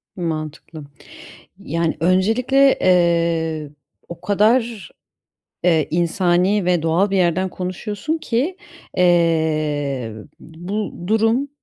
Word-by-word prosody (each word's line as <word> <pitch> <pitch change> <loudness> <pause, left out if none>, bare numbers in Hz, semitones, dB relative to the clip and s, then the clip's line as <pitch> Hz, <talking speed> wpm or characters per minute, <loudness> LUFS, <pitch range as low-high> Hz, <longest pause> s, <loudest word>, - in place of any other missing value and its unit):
Mantıklı. 155 -2 -5 0.8
Yani, 165 -3 -2
öncelikle, 225 - +3
eee, 170 -3 +1 0.4
o 170 - -10
kadar, 215 -2 +1 0.7
eee, 165 -3 +2
insani 175 +3 +1
ve 175 -2 +2
doğal 170 +5 +1
bir 195 - 0
yerden 185 +1 +1
konuşuyorsun 205 - -4
ki, 290 +7 -2 0.4
eee, 155 -7 +1 0.3
bu 175 +3 -6
durum 225 +6 +2
175 Hz, 90 wpm, -20 LUFS, 160-205 Hz, 0.8 s, öncelikle